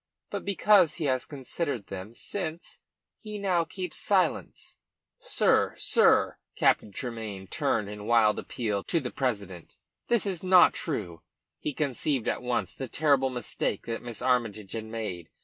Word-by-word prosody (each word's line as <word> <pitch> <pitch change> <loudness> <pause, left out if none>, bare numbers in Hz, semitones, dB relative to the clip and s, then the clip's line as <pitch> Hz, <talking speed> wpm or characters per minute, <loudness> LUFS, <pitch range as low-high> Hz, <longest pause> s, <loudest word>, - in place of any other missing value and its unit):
But - - -3
because 200 -4 +4
he 165 - -3
has 130 -2 0
considered 140 - -4
them 95 +3 -7
since, 170 -1 -5 0.4
he 215 -2 -6
now 185 -4 +1
keeps 180 +1 -6
silent." 185 -5 0 0.5
"Sir, - - +2
sir," - - +3 0.2
Captain 105 - +2
Tremayne 110 -4 -5
turned 105 +2 0
in 105 0 -7
wild 115 -2 +4
appeal 105 -5 -3
to 170 - +1
the 125 -5 -5
president, 100 - -3 0.3
"this 235 -3 +3
is 190 -4 -2
not 185 -1 +6
true." 95 - -3 0.4
He - - -2
conceived 140 -2 -1
at - - 0
once 125 -1 -1
the 135 - -5
terrible 140 0 +2
mistake 125 -3 -3
that 115 -1 -4
Miss 120 -3 -6
Armytage 115 -6 0
had 110 -1 -4
made. 110 -7 -5
125 Hz, 150 wpm, -28 LUFS, 105-165 Hz, 0.5 s, not